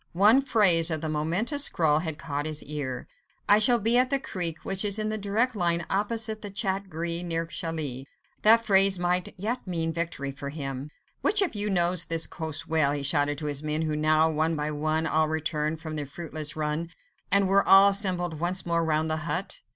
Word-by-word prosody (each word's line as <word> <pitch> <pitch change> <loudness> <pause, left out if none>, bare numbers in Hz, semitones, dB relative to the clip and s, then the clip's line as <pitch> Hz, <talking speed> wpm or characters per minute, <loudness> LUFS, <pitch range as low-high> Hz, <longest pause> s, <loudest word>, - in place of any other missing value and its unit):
One 210 +9 +4
phrase 190 -10 +5
of 160 -2 -2
the 160 - -3
momentous 180 - 0
scrawl 155 -3 +1
had 160 -2 -3
caught 145 -1 -5
his 155 -1 -5
ear. 140 -4 -6 0.4
"I 205 - +5
shall 240 +3 +5
be 230 +3 +2
at 255 0 +1
the 275 - +1
creek 175 -10 -3
which 195 +1 -1
is 205 0 +3
in 215 0 -2
a 215 - -3
direct 220 +5 -1
line 170 -3 0
opposite 215 +2 0
the 205 - -7
'Chat 195 -1 -3
Gris' 170 +1 -3
near 165 -1 -2
Calais": 160 -6 -5 0.4
that 230 +2 +5
phrase 195 -2 +6
might 180 0 -2
yet 220 +4 -4
mean 165 -2 -3
victory 165 -5 -4
for 140 0 -8
him. 140 -1 -6 0.3
"Which 415 -1 +3
of 375 - -3
you 210 0 -1
knows 175 -2 +2
this 165 0 +2
coast 160 -2 -5
well?" 155 -3 +1
he 145 -1 -4
shouted 145 0 +1
to 150 - -7
his 145 -1 -4
men 155 +1 -2
who 155 -1 -2
now 155 +1 +2
one 160 +1 -1
by 150 0 -3
one 155 +2 -1
had - - -2
all 155 0 +2
returned 155 0 -2
from 160 -1 -7
their 145 -2 -4
fruitless 155 -1 -4
run, 155 +2 -3 0.4
and 200 0 +5
were 195 +1 +3
all 195 +1 +7
assembled 180 -5 -1
once 180 +3 -3
more 170 -1 0
round 160 0 0
the 155 0 -1
hut. 160 +4 -4
165 Hz, 210 wpm, -26 LUFS, 155-195 Hz, 0.4 s, all